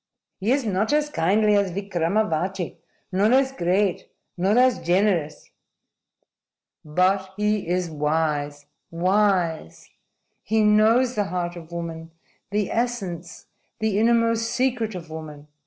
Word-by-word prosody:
"He 205 Hz, +5 st, 0 dB
is 270 Hz, -1 st, +1 dB
not 210 Hz, +2 st, 0 dB
as 300 Hz, 0 st, +1 dB
kindly 210 Hz, -, +2 dB
as 200 Hz, -1 st, +2 dB
Vikramavati, 185 Hz, -1 st, -1 dB, 0.3 s
nor 200 Hz, +4 st, +2 dB
as 265 Hz, 0 st, +3 dB
great, 185 Hz, -3 st, 0 dB, 0.3 s
nor 195 Hz, +5 st, +1 dB
as 255 Hz, 0 st, +4 dB
generous." 175 Hz, -4 st, 0 dB, 1.3 s
"But 185 Hz, +5 st, +1 dB
he 210 Hz, -2 st, 0 dB
is 180 Hz, 0 st, 0 dB
wise 150 Hz, -1 st, -1 dB, 0.2 s
wise! 180 Hz, -, 0 dB, 0.5 s
He 220 Hz, 0 st, +1 dB
knows 220 Hz, +4 st, +4 dB
the 210 Hz, -3 st, 0 dB
heart 175 Hz, -2 st, -3 dB
of 170 Hz, -1 st, -11 dB
woman 165 Hz, -1 st, -6 dB, 0.4 s
the 205 Hz, 0 st, -1 dB
essence, 195 Hz, -8 st, -3 dB, 0.3 s
the 215 Hz, -2 st, 0 dB
innermost 230 Hz, 0 st, +2 dB
secret 240 Hz, -4 st, -1 dB
of 165 Hz, -3 st, -8 dB
woman." 150 Hz, -2 st, -9 dB
195 Hz, 120 wpm, -23 LUFS, 170-220 Hz, 1.3 s, as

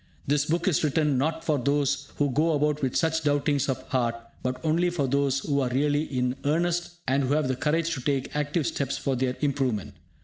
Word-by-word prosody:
This 145 Hz, +1 st, +2 dB
book 170 Hz, +3 st, 0 dB
is 170 Hz, -5 st, +2 dB
written 150 Hz, -2 st, +2 dB
not 160 Hz, +3 st, -1 dB
for 150 Hz, -3 st, +1 dB
those 140 Hz, +1 st, 0 dB
who 145 Hz, -2 st, +1 dB
go 160 Hz, +5 st, +2 dB
about 150 Hz, 0 st, +1 dB
with 130 Hz, -2 st, -1 dB
such 160 Hz, -1 st, +1 dB
doubtings 145 Hz, -1 st, +1 dB
of 130 Hz, -, -3 dB
heart, 120 Hz, -3 st, +1 dB, 0.3 s
but 125 Hz, 0 st, -2 dB
only 170 Hz, +3 st, +2 dB
for 170 Hz, -5 st, -1 dB
those 140 Hz, 0 st, +1 dB
who 140 Hz, -1 st, 0 dB
are 130 Hz, -2 st, +1 dB
really 145 Hz, +4 st, +1 dB
in 125 Hz, -2 st, -1 dB
earnest, 175 Hz, +4 st, 0 dB
and 135 Hz, +1 st, +2 dB
who 140 Hz, +3 st, +1 dB
have 155 Hz, -3 st, +1 dB
the 130 Hz, -, 0 dB
courage 160 Hz, +4 st, 0 dB
to 130 Hz, -, -4 dB
take 135 Hz, +1 st, -1 dB
active 150 Hz, +1 st, 0 dB
steps 140 Hz, -1 st, -1 dB
for 135 Hz, -, -1 dB
their 125 Hz, 0 st, -1 dB
improvement. 135 Hz, -8 st, -1 dB
145 Hz, 210 wpm, -26 LUFS, 135-155 Hz, 0.3 s, This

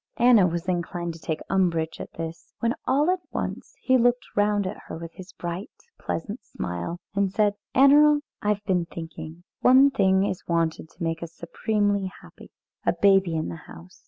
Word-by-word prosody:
Anna 235 Hz, -6 st, +6 dB
was 170 Hz, +1 st, -3 dB
inclined 175 Hz, -1 st, -2 dB
to 165 Hz, -, -12 dB
take 160 Hz, -1 st, -3 dB
umbrage 170 Hz, -4 st, 0 dB
at -, -, -8 dB
this, 165 Hz, 0 st, -7 dB
when 230 Hz, 0 st, +1 dB
all 295 Hz, +6 st, +3 dB
at 370 Hz, -, 0 dB
once -, -, -5 dB
he 260 Hz, 0 st, +3 dB
looked 245 Hz, +1 st, +2 dB
round 205 Hz, -1 st, +2 dB
at 185 Hz, -, -5 dB
her -, -, -6 dB
with 165 Hz, 0 st, -8 dB
his 185 Hz, 0 st, -11 dB
bright 175 Hz, +3 st, -5 dB, 0.3 s
pleasant 205 Hz, +7 st, -4 dB
smile 90 Hz, -, -5 dB, 0.2 s
and 200 Hz, -1 st, +1 dB
said, 205 Hz, 0 st, +2 dB, 0.2 s
"Annerl! 290 Hz, +2 st, +6 dB, 0.2 s
I -, -, -4 dB
have 210 Hz, 0 st, 0 dB
been 180 Hz, -4 st, +1 dB
thinking. 165 Hz, 0 st, -8 dB, 0.2 s
One 265 Hz, +2 st, +6 dB
thing 190 Hz, -3 st, +3 dB
is 185 Hz, -, -4 dB
wanted 165 Hz, -2 st, 0 dB
to 175 Hz, -, -9 dB
make 165 Hz, 0 st, -2 dB
us 170 Hz, -1 st, -7 dB
supremely 205 Hz, +2 st, -1 dB
happy -, -, -15 dB, 0.3 s
a -, -, +2 dB
baby 195 Hz, -4 st, +3 dB
in 155 Hz, -, -2 dB
the 85 Hz, -, -6 dB
house. 85 Hz, +2 st, -13 dB
190 Hz, 185 wpm, -25 LUFS, 165-210 Hz, 0.3 s, Anna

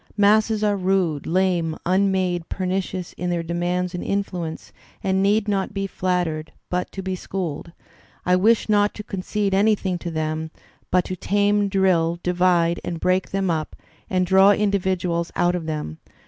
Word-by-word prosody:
Masses 215 Hz, +1 st, +3 dB
are 205 Hz, -1 st, +1 dB
hide, 180 Hz, -6 st, 0 dB
lame, 175 Hz, -2 st, +1 dB
unmade, 185 Hz, -2 st, +1 dB
pernicious 185 Hz, -1 st, -3 dB
in 180 Hz, -, -1 dB
their 170 Hz, -1 st, -1 dB
demands 175 Hz, +2 st, -1 dB
and 180 Hz, -, -4 dB
influence, 180 Hz, -5 st, -3 dB, 0.3 s
and 190 Hz, 0 st, +1 dB
need 205 Hz, +2 st, +2 dB
not 195 Hz, -2 st, 0 dB
to -, -, -17 dB
be 195 Hz, 0 st, -2 dB
flattered, 175 Hz, -5 st, -2 dB, 0.2 s
but 180 Hz, 0 st, -1 dB
to 195 Hz, -, -5 dB
be 190 Hz, 0 st, -2 dB
schooled. 175 Hz, -3 st, -5 dB, 0.5 s
I 180 Hz, -, +4 dB
wish 220 Hz, +5 st, +3 dB
not 205 Hz, -1 st, +2 dB
to 210 Hz, -, -6 dB
concede 200 Hz, 0 st, -2 dB
anything 195 Hz, -3 st, +2 dB
to 170 Hz, -, -5 dB
them, 155 Hz, 0 st, -2 dB, 0.4 s
but 180 Hz, -1 st, +2 dB
to 185 Hz, -, -4 dB
tame, 205 Hz, +2 st, +1 dB
drill, 180 Hz, -4 st, +2 dB
divide 175 Hz, -1 st, +2 dB
and 170 Hz, -2 st, -4 dB
break 185 Hz, +2 st, +1 dB
them 195 Hz, -2 st, 0 dB
up 155 Hz, -2 st, -3 dB, 0.3 s
and 185 Hz, -1 st, +1 dB
draw 190 Hz, +2 st, +6 dB
individuals 185 Hz, -4 st, 0 dB
out 175 Hz, 0 st, +2 dB
of 170 Hz, -3 st, -3 dB
them. 150 Hz, -, -4 dB
185 Hz, 160 wpm, -23 LUFS, 170-195 Hz, 0.5 s, draw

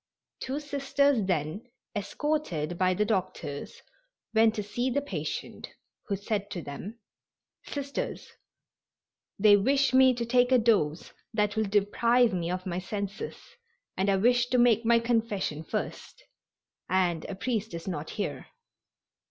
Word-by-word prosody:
Two 270 Hz, +3 st, -3 dB
Sisters 280 Hz, -5 st, +1 dB
then, 170 Hz, +5 st, -2 dB, 0.3 s
escorted 205 Hz, -, -2 dB
by 185 Hz, +1 st, +2 dB
the 210 Hz, -, +1 dB
doctors, 180 Hz, -8 st, -3 dB, 0.5 s
went 220 Hz, 0 st, +4 dB
to 210 Hz, -, -2 dB
see 240 Hz, +5 st, -2 dB
the 260 Hz, -, +1 dB
patient, 285 Hz, -, -5 dB, 0.4 s
who 200 Hz, -, 0 dB
said 205 Hz, +1 st, -3 dB
to 180 Hz, -5 st, -5 dB
them: 185 Hz, +11 st, -7 dB, 0.7 s
"Sisters, 280 Hz, -1 st, -4 dB, 1.1 s
they 205 Hz, 0 st, +7 dB
wish 270 Hz, +6 st, +2 dB
me 260 Hz, -1 st, +6 dB
to 235 Hz, 0 st, -2 dB
take 245 Hz, +1 st, +3 dB
a 255 Hz, -, +7 dB
dose 200 Hz, -10 st, +1 dB, 0.2 s
that 210 Hz, -1 st, +1 dB
will 220 Hz, 0 st, +1 dB
deprive 225 Hz, +4 st, +3 dB
me 170 Hz, -2 st, -1 dB
of 185 Hz, +1 st, -3 dB
my 180 Hz, -1 st, -2 dB
senses, 200 Hz, +2 st, -5 dB, 0.6 s
and 195 Hz, +2 st, +1 dB
I 195 Hz, -, +4 dB
wish 240 Hz, +4 st, +3 dB
to 250 Hz, -, +1 dB
make 240 Hz, -2 st, +4 dB
my 235 Hz, 0 st, +5 dB
confession 225 Hz, -9 st, -1 dB
first, -, -, -5 dB, 0.7 s
and 175 Hz, -3 st, +1 dB
a 195 Hz, -, -5 dB
priest 220 Hz, +1 st, -2 dB
is 165 Hz, -, -7 dB
not 160 Hz, -4 st, -4 dB
here." 205 Hz, -, -4 dB
210 Hz, 140 wpm, -28 LUFS, 185-245 Hz, 1.1 s, they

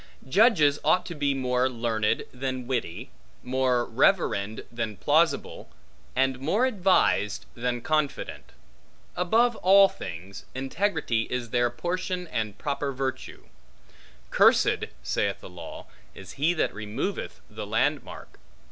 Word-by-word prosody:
Judges 155 Hz, -, +4 dB
ought 185 Hz, -, +3 dB
to 175 Hz, -, -6 dB
be 145 Hz, -3 st, 0 dB
more 125 Hz, -1 st, +1 dB
learned, 115 Hz, -3 st, 0 dB
than 130 Hz, -1 st, -4 dB
witty, 120 Hz, -9 st, -3 dB, 0.3 s
more 125 Hz, -1 st, +1 dB
reverend, 115 Hz, -, +1 dB
than 110 Hz, -3 st, -4 dB
plausible, -, -, +1 dB, 0.5 s
and 130 Hz, 0 st, +1 dB
more 185 Hz, -, +1 dB
advised, 185 Hz, -, +2 dB
than 120 Hz, 0 st, -2 dB
confident. 155 Hz, +1 st, -1 dB, 0.7 s
Above 225 Hz, +7 st, +3 dB
all 195 Hz, +2 st, +7 dB
things, 90 Hz, -, -8 dB
integrity 135 Hz, -, -1 dB
is 120 Hz, -2 st, -3 dB
their 120 Hz, -1 st, +2 dB
portion 180 Hz, +5 st, -3 dB
and 110 Hz, -3 st, -3 dB
proper 140 Hz, -1 st, -2 dB
virtue. 130 Hz, 0 st, -4 dB, 0.9 s
Cursed -, -, +4 dB, 0.2 s
(saith -, -, -1 dB
the -, -, -11 dB
law) -, -, -9 dB, 0.3 s
is 95 Hz, -2 st, -10 dB
he 155 Hz, +5 st, +1 dB
that -, -, 0 dB
removeth 110 Hz, -, -4 dB
the -, -, -7 dB
landmark. -, -, -2 dB
130 Hz, 120 wpm, -26 LUFS, 120-175 Hz, 0.9 s, all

